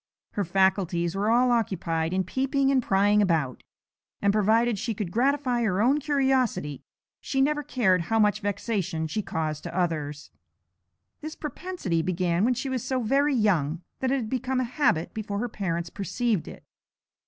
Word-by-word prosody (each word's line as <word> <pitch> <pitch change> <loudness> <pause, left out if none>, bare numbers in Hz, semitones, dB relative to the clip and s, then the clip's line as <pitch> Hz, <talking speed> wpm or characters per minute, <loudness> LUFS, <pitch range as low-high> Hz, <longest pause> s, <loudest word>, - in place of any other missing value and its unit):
Her 205 - -1
faculties 185 -1 +1
were 205 +2 0
all 245 +2 +4
occupied 170 -8 0
in 190 +1 +1
peeping 270 - 0
and 265 -2 +3
prying 205 0 +3
about, 160 - 0 0.6
and, 200 0 +2
provided 220 +1 +2
she 225 +1 -2
could 195 -4 -4
gratify 255 +1 +1
her 195 -5 +1
own 260 +7 +3
curiosity, 265 - 0 0.4
she 270 - -2
never 295 +2 +2
cared 205 -10 +2
how 225 +5 0
much 210 -1 +3
vexation 195 -5 -2
she 215 +7 -2
caused 155 -5 -3
to 170 - -6
others. 150 -5 -2 0.9
This 310 +1 -7
propensity 300 - -3
began 180 +1 0
when 250 +1 +2
she 260 +3 -3
was 260 -3 -2
so 260 -2 -1
very 275 +5 +2
young 175 - +1 0.2
that 260 - 0
it 270 - +2
had 235 -5 -3
become 260 0 -1
a - - +1
habit 245 - 0
before 210 -2 -4
her 240 +4 -1
parents 170 -6 -3
perceived 215 -1 -1
it. - - -10
210 Hz, 165 wpm, -26 LUFS, 180-255 Hz, 0.9 s, all